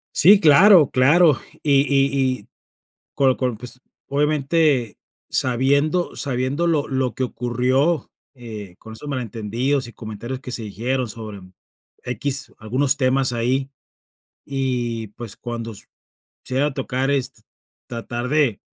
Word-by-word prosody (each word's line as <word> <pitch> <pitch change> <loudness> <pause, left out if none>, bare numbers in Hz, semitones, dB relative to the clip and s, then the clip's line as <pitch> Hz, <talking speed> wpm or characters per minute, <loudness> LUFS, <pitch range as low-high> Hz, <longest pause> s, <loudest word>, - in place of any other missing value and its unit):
Sí, 195 +6 +7
claro, 170 0 +7
claro. 150 +4 +4 0.2
Y 140 -2 +4
y 135 -2 +2
y - - -23 0.7
con 135 -2 +3
con, 125 -4 -2
pues 125 +2 -7 0.3
obviamente, 145 -3 +1 0.3
sabiendo 140 +7 +1
sabiendo 135 +4 -1
lo 155 -3 +1
lo 130 -3 -1
que 130 - -1
ocurrió, 125 +6 0 0.2
eh, 110 -7 -9
con 110 0 -11
esos 110 - -9
malentendidos 125 +1 -1
y 120 - -11
comentarios 115 +4 -7
que 130 -2 -8
se 120 - -3
dijeron 120 +4 -2
sobre 105 -3 -8 0.6
equis, 135 +3 -3
algunos 130 +5 +1
temas 130 -1 +2
ahí, 130 +3 0 0.7
y, 125 -4 -2
pues, 115 -3 -7
cuando 115 -1 -5
s 100 - -11 0.6
se 130 - -6
llega 135 +3 +2
a 150 - -3
tocar 135 0 -1
es 140 -3 0
t - - -22 0.5
tratar 120 +1 -4
de, 140 -7 +1
130 Hz, 135 wpm, -21 LUFS, 120-140 Hz, 0.7 s, Sí